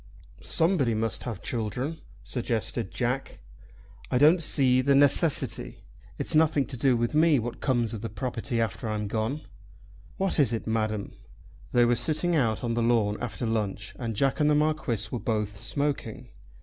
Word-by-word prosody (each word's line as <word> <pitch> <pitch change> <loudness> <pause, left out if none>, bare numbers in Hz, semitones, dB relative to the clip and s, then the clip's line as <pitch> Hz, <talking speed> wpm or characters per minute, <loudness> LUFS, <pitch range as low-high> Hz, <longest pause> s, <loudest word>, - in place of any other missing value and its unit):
"Somebody 160 - +1
must 110 0 -2
have 115 -6 -6
children," 125 +7 -3 0.2
suggested 115 -3 -2
Jack. 130 +2 -3 0.7
"I - - +1
don't 155 +6 +5
see 130 -4 +3
the 140 +1 +3
necessity. 145 +3 +3 0.3
It's - - -3
nothing 155 -3 +3
to 125 -2 +1
me 155 -1 +5
what 120 0 -4
comes 120 -4 0
of 110 - -5
the 115 - -4
property 120 -2 -3
after 115 0 -2
I'm 105 -1 -2
gone. 110 +8 -2 0.8
What 195 -4 -1
is 130 -5 +3
it, 115 - -3
Madam?" 110 -2 -2 0.6
They 120 -1 +4
were 120 - +3
sitting 155 +8 0
out 115 -7 +1
on 115 -1 -1
the 120 - 0
lawn 115 -3 +2
after 125 0 -4
lunch 110 -2 -2
and 115 -3 -3
Jack 135 +7 +1
and 150 0 +3
the 150 - +3
Marquis 150 -8 0
were 125 - -3
both 105 -3 -2
smoking. 125 -1 -2
120 Hz, 160 wpm, -27 LUFS, 110-140 Hz, 0.8 s, don't